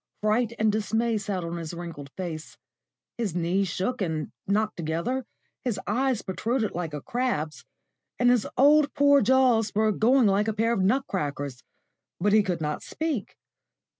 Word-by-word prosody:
Fright 220 Hz, +2 st, +1 dB
and 215 Hz, 0 st, +3 dB
dismay 220 Hz, +1 st, 0 dB
sat 195 Hz, -3 st, -3 dB
on 170 Hz, +1 st, -4 dB
his 165 Hz, 0 st, -6 dB
wrinkled 165 Hz, -5 st, -7 dB
face; 165 Hz, -4 st, -6 dB, 0.6 s
his 205 Hz, -8 st, -2 dB
knees 180 Hz, +3 st, +1 dB
shook 195 Hz, +8 st, -2 dB
and 160 Hz, -4 st, -2 dB, 0.2 s
knocked 210 Hz, +2 st, +1 dB
together, 170 Hz, +11 st, -2 dB, 0.4 s
his 230 Hz, -6 st, -1 dB
eyes 255 Hz, +2 st, 0 dB
protruded 215 Hz, +4 st, -1 dB
like 165 Hz, -4 st, -4 dB
a 145 Hz, -, -5 dB
crab's, 235 Hz, -12 st, -2 dB, 0.5 s
and 245 Hz, 0 st, +4 dB
his 245 Hz, -4 st, +2 dB
poor 295 Hz, +2 st, +6 dB, 0.3 s
old 215 Hz, -, 0 dB
jaws 245 Hz, -5 st, +4 dB
were 215 Hz, 0 st, +3 dB
going 240 Hz, +4 st, +4 dB
like 205 Hz, +1 st, +2 dB
a 220 Hz, -, 0 dB
pair 225 Hz, +2 st, +1 dB
of 195 Hz, -, 0 dB
nut 255 Hz, +9 st, +2 dB
crackers, 145 Hz, -7 st, -3 dB, 0.6 s
but 205 Hz, +3 st, +2 dB
he 215 Hz, -, +7 dB
could 180 Hz, -4 st, -2 dB
not 150 Hz, -1 st, -2 dB
speak. 310 Hz, -10 st, -3 dB
210 Hz, 165 wpm, -26 LUFS, 170-235 Hz, 0.6 s, he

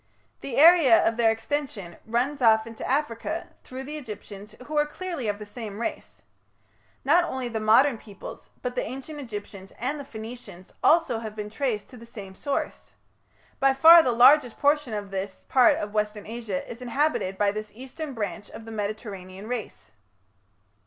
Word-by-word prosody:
The 265 Hz, -, -5 dB
area 315 Hz, -7 st, +7 dB
of 225 Hz, -, +1 dB
their 230 Hz, -1 st, +3 dB
extension 225 Hz, -, -3 dB
runs 255 Hz, +5 st, -1 dB
off 220 Hz, -2 st, +5 dB
into 230 Hz, -1 st, -9 dB
Africa, 295 Hz, +4 st, -2 dB
through 260 Hz, +1 st, -8 dB
the 300 Hz, +3 st, -6 dB
Egyptians, 210 Hz, -5 st, -9 dB
who 305 Hz, -, -6 dB
are 295 Hz, 0 st, +4 dB
clearly 335 Hz, -6 st, -5 dB
of 205 Hz, -1 st, -1 dB
the 210 Hz, -, -8 dB
same 210 Hz, -1 st, -8 dB
race. 235 Hz, -, -5 dB, 0.8 s
Not 335 Hz, +6 st, +5 dB
only 260 Hz, -6 st, -3 dB
the 225 Hz, -2 st, -3 dB
modern 225 Hz, +4 st, +4 dB
peoples, 205 Hz, -3 st, -11 dB
but 250 Hz, -1 st, -2 dB
the 250 Hz, -, -1 dB
Ancient 270 Hz, +5 st, -7 dB
Egyptians 205 Hz, -6 st, -8 dB
and 270 Hz, +6 st, -2 dB
the -, -, -6 dB
Phoenicians 220 Hz, -6 st, -10 dB
also 310 Hz, -8 st, +4 dB
have 220 Hz, -2 st, -7 dB
been 210 Hz, -1 st, -6 dB
traced 225 Hz, -3 st, -2 dB
to 250 Hz, -, -11 dB
the 230 Hz, 0 st, -13 dB
same 200 Hz, -5 st, -10 dB
source. 280 Hz, +8 st, -4 dB, 0.7 s
By 270 Hz, 0 st, +4 dB
far 330 Hz, +5 st, +9 dB
the 255 Hz, -, +1 dB
largest 245 Hz, +1 st, +5 dB
portion 285 Hz, -5 st, +1 dB
of 205 Hz, -1 st, -5 dB
this 195 Hz, 0 st, -5 dB
part 255 Hz, -2 st, +5 dB
of 205 Hz, 0 st, -5 dB
Western 210 Hz, -1 st, -1 dB
Asia 220 Hz, -4 st, -5 dB
is 235 Hz, +1 st, -9 dB
inhabited 250 Hz, -6 st, 0 dB
by 205 Hz, 0 st, +2 dB
this 215 Hz, 0 st, -6 dB
eastern 265 Hz, +3 st, -7 dB
branch 205 Hz, -2 st, -4 dB
of 225 Hz, -, -10 dB
the 225 Hz, -, -9 dB
Mediterranean 200 Hz, -3 st, -6 dB
race." 220 Hz, -, -6 dB
230 Hz, 175 wpm, -26 LUFS, 210-275 Hz, 0.8 s, far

